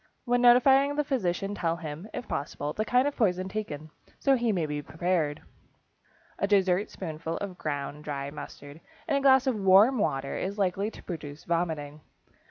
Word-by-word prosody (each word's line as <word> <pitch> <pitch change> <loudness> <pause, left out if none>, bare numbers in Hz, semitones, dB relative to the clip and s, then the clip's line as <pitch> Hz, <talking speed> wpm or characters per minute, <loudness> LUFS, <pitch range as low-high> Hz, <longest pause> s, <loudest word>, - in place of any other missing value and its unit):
When 245 -1 +2
notifying 265 +3 +6
the 295 - +1
physician 200 -8 -1
tell 165 -4 -1
him, 165 +2 -7
if - - -6
possible, 145 +1 -3
the 215 - -1
kind 250 +5 +3
of 290 - -2
poison 185 -5 +1
taken, 155 -7 -5 0.3
so 275 - +4
he 240 -2 +1
may 175 -6 0
be 150 -1 -3
prepared. 160 -1 -1 1.0
A 200 - +1
dessert 195 -1 +2
spoonful 165 -2 -5
of 190 -3 -6
ground 145 0 -4
dry 140 -1 -4
mustard 145 +1 -10 0.3
in 310 - 0
a 280 - +1
glass 265 -1 +5
of 260 - +2
warm 200 +6 +6
water 135 -8 -1
is 195 +2 -3
likely 195 +1 0
to - - -13
produce 150 -4 -7
vomiting. 160 -3 -2
180 Hz, 175 wpm, -28 LUFS, 150-220 Hz, 1.0 s, notifying